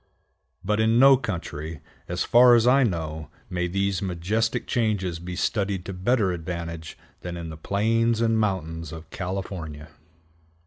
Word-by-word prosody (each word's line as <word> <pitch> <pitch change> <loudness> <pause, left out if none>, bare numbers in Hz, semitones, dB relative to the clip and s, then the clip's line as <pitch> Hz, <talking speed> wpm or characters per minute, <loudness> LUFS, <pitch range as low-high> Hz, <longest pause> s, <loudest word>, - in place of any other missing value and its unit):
But 105 +2 +1
in 110 +1 +3
no 135 +2 +8
country, 80 - -5 0.3
as - - -1
far 120 0 +7
as 115 -1 +3
I 130 +3 +5
know, 80 - -2 0.2
may 90 0 -1
these 100 +1 -1
majestic 100 +5 -1
changes 100 -8 -1
be 90 +1 -6
studied 100 -1 -1
to 95 - -5
better 95 +2 +1
advantage 85 -1 -5 0.2
than 90 -1 -6
in 85 -1 -6
the - - -7
plains 115 +6 +1
and 115 -1 +2
mountains 80 -6 -2
of 80 0 -10
California. 90 -5 -5
95 Hz, 145 wpm, -25 LUFS, 85-110 Hz, 0.3 s, no